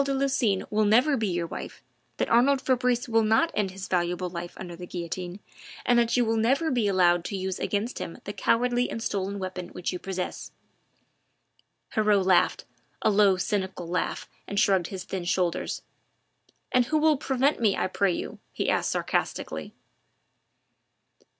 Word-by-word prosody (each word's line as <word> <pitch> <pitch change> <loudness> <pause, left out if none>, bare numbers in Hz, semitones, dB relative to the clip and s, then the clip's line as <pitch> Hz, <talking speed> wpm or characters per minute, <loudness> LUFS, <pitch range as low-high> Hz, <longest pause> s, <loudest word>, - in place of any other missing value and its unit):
de 275 0 -1
Lucines 260 -8 +1
will 215 0 +2
never 245 +8 +4
be 225 -4 0
your 175 -2 -1
wife, - - -8 0.3
that - - 0
Arnould 260 +4 +4
Fabrice 250 -1 +1
will 225 -1 +3
not 225 +10 +3
end 205 -2 0
his 190 +1 -7
valuable 180 0 -1
life 175 0 -6
under 175 -2 -7
the 180 +1 -9
guillotine 175 +2 -5 0.5
and 245 -1 +4
that 235 +1 +2
you 245 - +3
will 225 0 +1
never 270 +9 +2
be 240 -5 +1
allowed 175 -3 +3
to 200 - -3
use 190 0 -3
against 210 +4 -2
him 165 - -6
the 205 - -5
cowardly 245 +4 +1
and 225 - -4
stolen 200 0 -2
weapon 185 -2 -5
which 180 +1 -3
you 180 - -4
possess." 185 -1 -5 1.4
Heriot 210 -3 +3
laughed 185 -2 +3 0.4
a 215 - +4
low, 200 -2 +4
cynical 190 -2 -2
laugh 175 0 -2 0.2
and 200 - -1
shrugged 190 -4 +3
his 190 -2 -6
thin 185 -2 -5
shoulders: 180 -1 -1 0.9
"And 250 -1 +4
who 310 +6 +1
will 310 0 +4
prevent 265 +1 +1
me, 210 -4 +3
I - - +1
pray 190 0 +1
you?" - - -5
he - - 0
asked - - +1
sarcastically. - - -2
200 Hz, 170 wpm, -27 LUFS, 185-240 Hz, 1.4 s, never